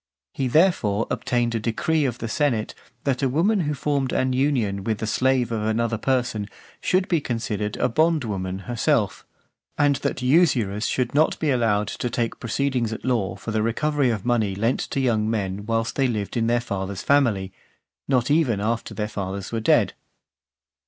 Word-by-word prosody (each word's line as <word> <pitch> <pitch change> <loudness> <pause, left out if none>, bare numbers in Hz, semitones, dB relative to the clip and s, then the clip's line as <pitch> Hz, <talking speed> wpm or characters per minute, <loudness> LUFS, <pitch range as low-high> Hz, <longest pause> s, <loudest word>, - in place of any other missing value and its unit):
He, 135 - -1
therefore, 120 - +3
obtained 120 -1 0
a 115 - 0
decree 145 +8 0
of 120 -3 -2
the 115 - -4
senate, 115 -4 0 0.3
that 135 -2 0
a 135 - +2
woman 185 - +2
who 150 -4 -1
formed 140 -2 -1
an 130 0 +1
union 125 -8 0
with 110 +1 -1
the 110 - -3
slave 130 +1 +1
of 110 -2 -1
another 110 +1 0
person, 125 -6 -1 0.3
should 185 0 +1
be 170 -4 +1
considered 110 -4 -3
(454) - - 0
a - - +4
bondwoman 110 - 0
herself; 120 -4 0 0.5
and 145 -2 +3
that 140 -2 -3
usurers 125 - +2
should 125 -2 -1
not 155 +3 +3
be 155 -3 0
allowed 110 -5 +1
to 125 - -3
take 115 -1 -2
proceedings 125 -1 -1
at 110 - -6
law 115 -8 0
for 100 +3 -6
the 110 0 0
recovery 140 +5 +1
of 110 -3 -2
money 110 -5 +1
lent 115 +6 0
to - - -3
young 110 -5 +1
men 100 -2 -2
whilst 115 0 -1
they 135 -1 +3
lived 105 -5 -3
in 115 -1 +1
their 120 +1 +2
father's 100 -4 -4
family, 110 -10 +2 0.5
not 130 -1 +1
even 140 -9 +2
after 110 +2 -2
their 105 -1 -2
fathers 100 -2 -5
were 115 - -1
dead. 110 - +3
120 Hz, 180 wpm, -24 LUFS, 105-135 Hz, 0.5 s, a